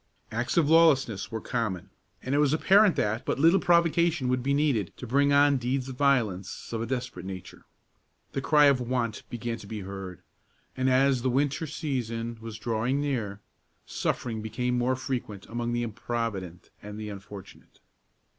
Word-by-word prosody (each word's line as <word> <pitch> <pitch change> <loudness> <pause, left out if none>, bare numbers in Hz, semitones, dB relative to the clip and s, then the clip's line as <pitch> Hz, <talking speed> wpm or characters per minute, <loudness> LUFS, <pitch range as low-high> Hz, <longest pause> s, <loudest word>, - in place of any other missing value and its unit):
Acts 120 +7 -2
of 160 -4 +4
lawlessness 145 -10 +4
were 110 - -3
common, 110 -7 -3 0.3
and 130 - -2
it 145 - +3
was 150 -1 +3
apparent 195 +4 +5
that 110 +3 0
but - - -1
little 165 +7 +5
provocation 170 -4 +2
would 125 0 +1
be 135 +3 -1
needed 140 - +1
to - - -7
bring 140 +4 +2
on 140 0 +5
deeds 130 +1 -2
of 130 - -6
violence 120 -10 0
of 115 - -2
a 115 - -3
desperate 125 -8 -4
nature. 95 -1 -9 0.7
The 135 - -3
cry 150 +1 +5
of 140 -3 +4
want 120 -3 -2
began 120 -1 -4
to 100 - -11
be 105 0 -5
heard, 95 -1 -8 0.5
and, 130 0 +1
as 130 0 +3
the 130 - +1
winter 140 +4 0
season 115 -7 -3
was 115 -1 -7
drawing 120 +5 -1
near, 115 -9 -2 0.4
suffering 115 -3 -2
became 125 +3 -2
more 125 +1 +1
frequent 120 -6 -5
among 120 0 -3
the 120 0 0
improvident 110 -6 -4
and 105 +1 -8
the 105 -1 -5
unfortunate. 100 -1 -11
125 Hz, 170 wpm, -27 LUFS, 110-140 Hz, 0.7 s, apparent